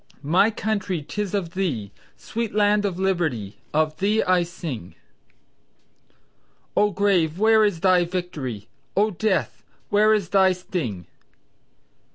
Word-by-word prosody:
"My 175 Hz, +9 st, +4 dB
Country 200 Hz, -6 st, -2 dB
tis 205 Hz, +5 st, -3 dB
of 180 Hz, -5 st, -2 dB
thee 135 Hz, -, -2 dB, 0.3 s
Sweet 230 Hz, -2 st, -4 dB
land 205 Hz, 0 st, +3 dB
of 190 Hz, -3 st, -2 dB
liberty, 160 Hz, -, -1 dB
Of 155 Hz, 0 st, 0 dB
thee 210 Hz, +3 st, +2 dB
I 185 Hz, -1 st, +3 dB
sing." 165 Hz, -, -6 dB, 1.8 s
"O! 210 Hz, -, +4 dB
Grave, 180 Hz, -5 st, +1 dB
where 220 Hz, +1 st, +5 dB
is 200 Hz, -6 st, 0 dB
thy 185 Hz, -2 st, +4 dB
Victory, 150 Hz, -, -5 dB, 0.3 s
O! 210 Hz, +2 st, +3 dB
Death 200 Hz, +1 st, -1 dB, 0.3 s
where 215 Hz, +1 st, +4 dB
is 200 Hz, -5 st, -2 dB
thy 190 Hz, -1 st, +4 dB
sting!" 150 Hz, -, -4 dB
185 Hz, 125 wpm, -23 LUFS, 160-205 Hz, 1.8 s, where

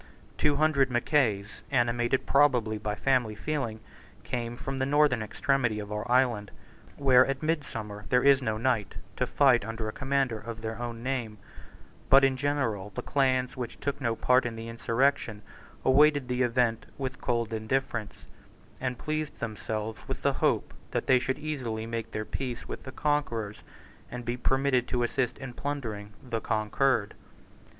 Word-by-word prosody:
Two 150 Hz, -1 st, +2 dB
hundred 140 Hz, -3 st, +3 dB
Mackays, 120 Hz, -5 st, +1 dB
animated 120 Hz, 0 st, +1 dB
probably 125 Hz, -7 st, +3 dB
by 105 Hz, 0 st, -2 dB
family 125 Hz, -4 st, +1 dB
feeling, 120 Hz, -3 st, -3 dB, 0.4 s
came 120 Hz, -1 st, -3 dB
from 135 Hz, +1 st, -4 dB
the 130 Hz, -, +1 dB
northern 145 Hz, -4 st, +3 dB
extremity 120 Hz, 0 st, 0 dB
of 105 Hz, -1 st, -6 dB
our 105 Hz, +3 st, -3 dB
island, 120 Hz, -5 st, +3 dB, 0.5 s
where 130 Hz, -2 st, +6 dB
at 135 Hz, +1 st, -3 dB
midsummer 110 Hz, -10 st, -3 dB
there 125 Hz, 0 st, +4 dB
is 140 Hz, -1 st, +6 dB
no 110 Hz, -4 st, -1 dB
night, 115 Hz, -3 st, 0 dB, 0.2 s
to -, -, 0 dB
fight 130 Hz, -5 st, +4 dB
under 115 Hz, 0 st, -4 dB
a -, -, -2 dB
commander 135 Hz, -4 st, 0 dB
of 115 Hz, +1 st, -7 dB
their 110 Hz, 0 st, -4 dB
own 120 Hz, -1 st, -5 dB
name: 125 Hz, -5 st, -2 dB, 0.7 s
but 135 Hz, +1 st, +8 dB
in 135 Hz, -1 st, +4 dB
general 130 Hz, -8 st, -1 dB
the -, -, -4 dB
clans 130 Hz, -2 st, +1 dB
which 125 Hz, -3 st, -6 dB
took 140 Hz, 0 st, -3 dB
no 115 Hz, -3 st, 0 dB
part 125 Hz, +3 st, +3 dB
in 120 Hz, -1 st, -3 dB
the 115 Hz, 0 st, -7 dB
insurrection 115 Hz, -2 st, 0 dB, 0.4 s
awaited 145 Hz, 0 st, +5 dB
the 125 Hz, 0 st, -1 dB
event 120 Hz, -2 st, +1 dB
with 135 Hz, -1 st, -4 dB
cold 115 Hz, -2 st, -1 dB
indifference, 110 Hz, 0 st, -2 dB, 0.5 s
and 125 Hz, -1 st, -2 dB
pleased 155 Hz, +1 st, -3 dB
themselves 110 Hz, 0 st, -4 dB
with -, -, -5 dB
the -, -, +3 dB
hope -, -, +1 dB, 0.2 s
that -, -, -2 dB
they 130 Hz, -1 st, +5 dB
should 130 Hz, +1 st, -1 dB
easily 130 Hz, -8 st, -3 dB
make 115 Hz, -1 st, -4 dB
their 110 Hz, 0 st, -4 dB
peace 125 Hz, +2 st, -4 dB
with -, -, -6 dB
the 130 Hz, -, -8 dB
conquerors, 120 Hz, -8 st, -1 dB, 0.5 s
and 120 Hz, -1 st, -6 dB
be 120 Hz, +1 st, -1 dB
permitted 135 Hz, 0 st, +1 dB
to 125 Hz, -1 st, 0 dB
assist 125 Hz, +1 st, 0 dB
in 130 Hz, -2 st, -7 dB
plundering 115 Hz, -8 st, -4 dB, 0.2 s
the 115 Hz, -2 st, -2 dB
conquered. 110 Hz, +1 st, +1 dB
125 Hz, 160 wpm, -28 LUFS, 110-135 Hz, 0.7 s, but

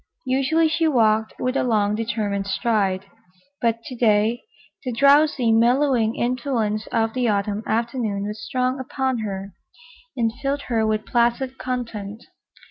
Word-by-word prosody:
Usually 275 Hz, +5 st, +2 dB
she 320 Hz, +1 st, +1 dB
walked 220 Hz, -6 st, +2 dB
with 255 Hz, +1 st, -1 dB
a -, -, +2 dB
long, 210 Hz, -4 st, +1 dB
determined 210 Hz, -3 st, -2 dB
stride, 195 Hz, -2 st, 0 dB, 0.6 s
but 230 Hz, -1 st, 0 dB
to 255 Hz, -, -8 dB
day 225 Hz, 0 st, +2 dB, 0.4 s
the 255 Hz, -, -3 dB
drowsy, 280 Hz, -1 st, +4 dB
mellowing 235 Hz, 0 st, +3 dB
influence 235 Hz, -4 st, -1 dB
of 225 Hz, -1 st, 0 dB
the 250 Hz, -1 st, 0 dB
Autumn 205 Hz, 0 st, 0 dB
afternoon 230 Hz, -3 st, -1 dB
was 210 Hz, +1 st, -6 dB
strong 255 Hz, +1 st, -1 dB
upon 260 Hz, -1 st, -2 dB
her 195 Hz, -2 st, -5 dB, 0.6 s
and 225 Hz, -2 st, +1 dB
filled 280 Hz, +1 st, -1 dB
her 225 Hz, -3 st, 0 dB
with 215 Hz, 0 st, -1 dB
placid 240 Hz, +2 st, 0 dB
content. 230 Hz, -4 st, -5 dB
230 Hz, 135 wpm, -22 LUFS, 215-255 Hz, 0.6 s, drowsy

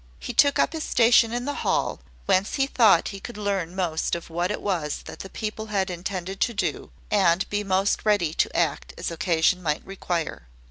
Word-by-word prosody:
He -, -, -6 dB
took 285 Hz, -1 st, +4 dB
up -, -, +2 dB
his 320 Hz, -1 st, -3 dB
station 230 Hz, -1 st, +4 dB
in 245 Hz, +1 st, -2 dB
the 290 Hz, -, -2 dB
hall, -, -, 0 dB, 0.3 s
whence 190 Hz, +2 st, +2 dB
he 270 Hz, -, +2 dB
thought 220 Hz, -10 st, +4 dB
he 195 Hz, -, -7 dB
could 235 Hz, +3 st, -9 dB
learn 195 Hz, -4 st, -2 dB
most 170 Hz, -4 st, -1 dB
of 170 Hz, -1 st, -8 dB
what 175 Hz, +2 st, -1 dB
it 210 Hz, -, -2 dB
was 170 Hz, -7 st, -2 dB
that -, -, -10 dB
the 190 Hz, -, -7 dB
people 215 Hz, +2 st, -5 dB
had 195 Hz, -3 st, -1 dB
intended 185 Hz, +1 st, -5 dB
to 235 Hz, -, +1 dB
do, 205 Hz, -3 st, -2 dB, 0.2 s
and 185 Hz, -3 st, +3 dB
be 205 Hz, 0 st, 0 dB
most 195 Hz, 0 st, +1 dB
ready 205 Hz, -7 st, +2 dB
to -, -, 0 dB
act -, -, -1 dB
as -, -, -3 dB
occasion 170 Hz, +1 st, +1 dB
might 150 Hz, -3 st, -2 dB
require. 175 Hz, -, -4 dB
195 Hz, 200 wpm, -25 LUFS, 170-210 Hz, 0.3 s, took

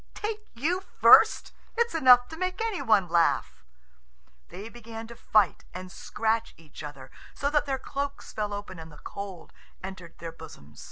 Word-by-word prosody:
"Take 425 Hz, 0 st, -4 dB
you 335 Hz, +10 st, 0 dB, 0.2 s
first! -, -, +7 dB, 0.2 s
It's 470 Hz, 0 st, +2 dB
enough 250 Hz, -6 st, +6 dB
to 320 Hz, -, -7 dB
make 370 Hz, +2 st, -3 dB
any 445 Hz, -4 st, -1 dB
one 205 Hz, -5 st, +3 dB
laugh!" 170 Hz, -, +1 dB, 0.9 s
They 195 Hz, +4 st, -8 dB
began 230 Hz, -1 st, -9 dB
to 235 Hz, +1 st, -11 dB
fight 210 Hz, -5 st, +2 dB
and 185 Hz, 0 st, -7 dB
scratch 225 Hz, +3 st, -2 dB
each 160 Hz, -3 st, -13 dB
other, 140 Hz, -3 st, -9 dB, 0.2 s
so 285 Hz, +1 st, -1 dB
that 295 Hz, -1 st, +2 dB
their 270 Hz, -1 st, 0 dB
cloaks 280 Hz, +2 st, -5 dB
fell 210 Hz, -1 st, -2 dB
open 205 Hz, -3 st, -6 dB
and 160 Hz, 0 st, -10 dB
the 150 Hz, -, -14 dB
cold 195 Hz, -1 st, -8 dB, 0.3 s
entered 185 Hz, -3 st, -9 dB
their 165 Hz, -1 st, -7 dB
bosoms. 75 Hz, -, -13 dB
220 Hz, 165 wpm, -27 LUFS, 180-280 Hz, 0.9 s, first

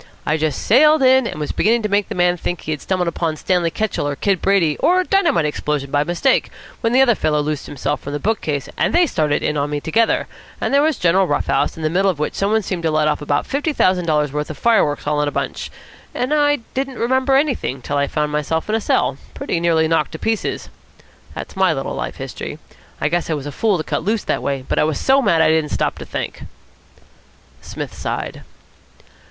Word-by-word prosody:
I 150 Hz, -, +1 dB
just 155 Hz, -3 st, -1 dB
sailed 300 Hz, +5 st, +5 dB
in, 260 Hz, -1 st, +5 dB
and -, -, -6 dB
was 150 Hz, -, -3 dB
beginning 230 Hz, +2 st, +2 dB
to -, -, +1 dB
make 205 Hz, -1 st, 0 dB
the -, -, -4 dB
man 175 Hz, 0 st, +3 dB
think 175 Hz, +1 st, -3 dB
that -, -, -16 dB
he 155 Hz, -, -2 dB
had 150 Hz, -, -3 dB
stumbled 180 Hz, -3 st, -1 dB
on 160 Hz, -2 st, 0 dB
Stanley 175 Hz, +1 st, 0 dB
Ketchel 210 Hz, -4 st, -2 dB
or 145 Hz, -, -2 dB
Kid 195 Hz, +3 st, 0 dB
Brady 180 Hz, -6 st, +2 dB
or 365 Hz, +1 st, +3 dB
a -, -, +2 dB
dynamite 350 Hz, -, +2 dB
explosion 150 Hz, -2 st, -2 dB
by 145 Hz, 0 st, +2 dB
mistake, 175 Hz, -, +1 dB, 0.3 s
when 230 Hz, -, +1 dB
the 260 Hz, +2 st, +5 dB
other 240 Hz, -3 st, +4 dB
fellow 150 Hz, -7 st, 0 dB
loosed 150 Hz, -1 st, -3 dB
himself 145 Hz, +1 st, -3 dB
from 140 Hz, -, -6 dB
the 145 Hz, -, -2 dB
bookcase, 155 Hz, -10 st, -1 dB
and -, -, +1 dB
they 350 Hz, 0 st, +5 dB
started 155 Hz, -, 0 dB
in 150 Hz, -, 0 dB
on 145 Hz, +1 st, -1 dB
me 145 Hz, 0 st, -2 dB
together, 225 Hz, +10 st, +1 dB, 0.3 s
and -, -, -2 dB
there 280 Hz, -, +5 dB
was 310 Hz, -3 st, +1 dB
a -, -, -17 dB
general 185 Hz, +2 st, +3 dB
rough -, -, 0 dB
house, -, -, 0 dB
in 160 Hz, -, -6 dB
the 155 Hz, -, +1 dB
middle 195 Hz, +3 st, +2 dB
of 180 Hz, -, -1 dB
which 150 Hz, -, -2 dB
somebody 215 Hz, +2 st, +1 dB
seemed 180 Hz, -2 st, -3 dB
to 165 Hz, -, 0 dB
let 155 Hz, 0 st, +2 dB
off 150 Hz, -1 st, 0 dB
about 145 Hz, -1 st, 0 dB
fifty 295 Hz, +3 st, -1 dB
thousand 185 Hz, -8 st, +2 dB
dollars' 150 Hz, -3 st, +1 dB
worth 150 Hz, 0 st, -3 dB
of 155 Hz, -, -6 dB
fireworks 190 Hz, -10 st, +2 dB
all 150 Hz, 0 st, +1 dB
in 150 Hz, -, 0 dB
a -, -, -1 dB
bunch; -, -, -3 dB, 0.5 s
and 255 Hz, +4 st, -1 dB
I 290 Hz, -1 st, +3 dB, 0.2 s
didn't 265 Hz, -1 st, -3 dB
remember 260 Hz, +3 st, +2 dB
anything 275 Hz, -, +1 dB
more 135 Hz, -, -14 dB
till 145 Hz, -, -2 dB
I 140 Hz, 0 st, +1 dB
found 150 Hz, 0 st, -1 dB
myself 150 Hz, +2 st, -1 dB
in -, -, 0 dB
a 225 Hz, -, +1 dB
cell, 135 Hz, -, +1 dB, 0.2 s
pretty 170 Hz, -, -2 dB
nearly 165 Hz, -2 st, +2 dB
knocked 165 Hz, -1 st, 0 dB
to -, -, -5 dB
pieces. 225 Hz, +5 st, -2 dB, 0.7 s
That's -, -, -7 dB
my 190 Hz, -3 st, +3 dB
little 135 Hz, -2 st, -4 dB
life -, -, -4 dB
history. -, -, -6 dB, 0.4 s
I -, -, +1 dB
guess 170 Hz, +2 st, -1 dB
I 160 Hz, -, +1 dB
was 145 Hz, -2 st, -6 dB
a 145 Hz, -, -5 dB
fool 205 Hz, +6 st, +1 dB
to 155 Hz, -, -3 dB
cut -, -, -2 dB
loose 215 Hz, +3 st, 0 dB
that -, -, -1 dB
way, 135 Hz, -2 st, -3 dB
but -, -, 0 dB
I -, -, +4 dB
was 155 Hz, -2 st, -1 dB
so 270 Hz, +1 st, +3 dB
mad 170 Hz, -9 st, +3 dB
I -, -, +4 dB
didn't 160 Hz, -1 st, +2 dB
stop -, -, -1 dB
to -, -, -7 dB
think." -, -, -5 dB, 1.2 s
Psmith -, -, -7 dB
sighed. -, -, -4 dB
170 Hz, 240 wpm, -19 LUFS, 150-225 Hz, 1.2 s, sailed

